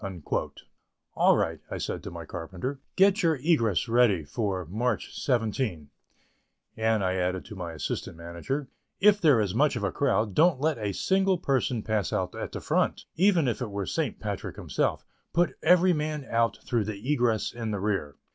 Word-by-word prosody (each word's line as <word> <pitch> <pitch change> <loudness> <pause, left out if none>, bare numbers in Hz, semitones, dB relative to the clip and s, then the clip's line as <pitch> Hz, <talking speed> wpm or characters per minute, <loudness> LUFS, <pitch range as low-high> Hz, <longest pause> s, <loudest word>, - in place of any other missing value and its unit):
"All - - +4
right," - - -1 0.2
said - - -3
I - - -10
to - - -7
my - - -8
carpenter, 95 +11 -5 0.2
"get 195 +2 +4
your 165 -2 +3
egress 125 - +1
ready 115 -7 +3
for 95 +1 -2
March 110 +9 -2
17"; 110 - -1 0.8
and 110 -2 +1
I 95 0 0
added, 90 0 -1
to 105 - -9
my 85 -3 -5
assistant 80 +2 -4
manager: 85 - -4 0.3
"If 210 0 +5
there 145 -9 +5
is 100 -4 0
much 140 +4 +3
of 115 - -3
a 100 - 0
crowd, 110 -7 +1
don't 160 - +4
let 150 -2 0
a 105 -2 -1
single 190 - +2
person 130 -6 0
pass 110 -3 -1
out - - -1
at - - -5
the - - -5
front, - - 0
even 180 -4 +3
if 120 - -1
it 120 - -2
were 100 -1 -3
St. - - -2
Patrick - - -4
himself; - - -1 0.3
put 175 +1 +2
every 180 +2 +5
man 150 -2 -2
out 115 0 +1
through 115 -4 0
the 110 +7 -2
egress 120 -6 +1
in 115 -2 -4
the 105 -2 -2
rear." 100 -8 -1
115 Hz, 180 wpm, -27 LUFS, 100-150 Hz, 0.8 s, If